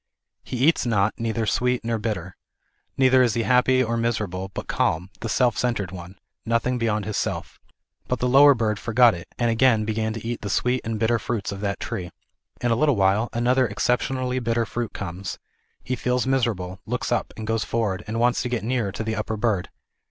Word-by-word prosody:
He 125 - -5
eats 165 -6 +3
not, 105 -2 +2
neither 115 0 -1
sweet 125 +2 0
nor 115 -1 -1
bitter. 100 -5 -4 0.6
Neither 130 -1 +5
is 120 -4 +2
he 115 - +1
happy 130 +1 +4
nor 115 -1 -1
miserable, 105 -5 -2
but - - -5
calm, 90 +4 0
the 115 - -4
self 120 +1 +2
centred 115 -7 -1
one, 90 0 -9 0.3
nothing 115 +2 0
beyond 105 -3 0
his 110 - -3
self. - - -3 0.5
But 125 - 0
the 125 - 0
lower 140 +2 +7
bird 110 -3 -1
forgot 120 +1 +4
it, 85 - -8
and 120 -1 +1
again 115 -2 +3
began 110 0 -1
to 115 0 -6
eat 120 0 -3
the 100 - -4
sweet 125 +6 +1
and 115 -1 -3
bitter 115 +1 +2
fruits 110 -5 -3
of 100 0 -6
that 100 -1 -2
tree. 90 -1 -4 0.5
In 120 - +1
a - - +4
little 145 +2 +3
while 100 +3 +2
another 125 +2 +2
exceptionally 125 +4 0
bitter 115 -1 0
fruit 120 +1 -4
comes; 95 0 -6 0.5
he 130 - -2
feels 125 +1 0
miserable, 110 -9 -1
looks 125 +1 -2
up, 120 - 0
and 110 - -5
goes 115 0 0
forward, 105 -6 -1
and 110 +2 -2
wants 120 +1 +2
to 125 - -2
get 120 -4 -2
nearer 120 -4 -1
to 110 - -4
the 110 0 -2
upper 110 +1 -3
bird. 105 -4 0
115 Hz, 205 wpm, -24 LUFS, 105-125 Hz, 0.6 s, lower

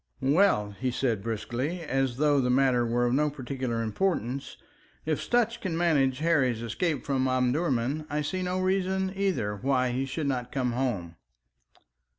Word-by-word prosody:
"Well," 155 - +3
he 130 - 0
said 120 -4 0
briskly, 120 - -3
and 160 - -8
as 135 -2 0
though 145 -1 +3
the 125 - 0
matter 125 -2 +3
were 120 +1 +1
of 120 - +1
no 150 +3 +2
particular 130 -4 -3
importance, 130 - -2 0.5
"if 155 -1 0
Sutch 235 -1 +1
can 175 -4 -2
manage 145 -7 +2
Harry's 135 -7 +1
escape 150 +5 -2
from 130 -2 +1
Omdurman, 130 +2 0
I 150 +1 -1
see 185 +5 -2
no 180 0 -1
reason, 190 0 0
either, 185 - 0
why 130 +2 +1
he 130 +2 -1
should 140 +3 -3
not 125 -3 -2
come 125 -3 0
home." 110 -10 -2
135 Hz, 160 wpm, -28 LUFS, 120-165 Hz, 0.5 s, Well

